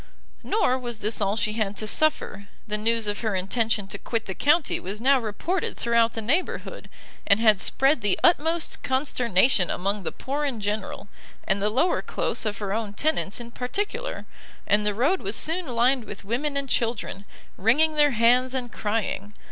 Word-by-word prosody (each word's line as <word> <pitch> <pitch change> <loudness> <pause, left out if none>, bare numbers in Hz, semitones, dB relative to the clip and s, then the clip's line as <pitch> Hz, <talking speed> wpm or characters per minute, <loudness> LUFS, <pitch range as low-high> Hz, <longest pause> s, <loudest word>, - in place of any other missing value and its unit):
Nor 260 - +1
was 240 -3 -4
this 215 +1 -2
all 200 +1 +1
she 215 -1 0
had 210 -2 -2
to 215 - -3
suffer; 210 -5 0 0.2
the 210 -1 -1
news 225 +1 +1
of 205 0 -2
her 220 -4 -1
intention 210 +2 0
to 200 - -6
quit 230 -2 -3
the 190 - -4
county 300 - +2
was 195 +3 -5
now 270 +3 +4
reported 255 - -3
throughout 235 -1 +2
the 225 - -5
neighbourhood, 295 +12 -2 0.4
and 200 - +4
had 215 -4 +4
spread 270 -1 +2
the 205 -2 +1
utmost 330 -1 +2
consternation 245 - +1
among 200 +3 -1
the 180 - -4
poor 285 +3 -4
in 270 -6 -2
general, 205 0 -4 0.4
and 195 +1 0
the 210 - +2
lower 270 +11 +1
close - - -2
of 205 -1 -3
her 200 -2 -3
own 215 -2 -3
tenants 245 -4 0
in 235 0 -9
particular, 410 - -4 0.4
and 210 0 +2
the 205 - 0
road 290 - +1
was 200 +3 -1
soon 335 +1 +2
lined 245 0 +1
with 200 -1 -9
women 280 +7 -2
and 280 -1 -2
children, 230 -5 -2 0.3
wringing 295 +11 +3
their 295 -1 +4
hands 250 +2 +3
and 245 -2 -3
crying. 210 -1 -3
230 Hz, 180 wpm, -25 LUFS, 210-275 Hz, 0.4 s, now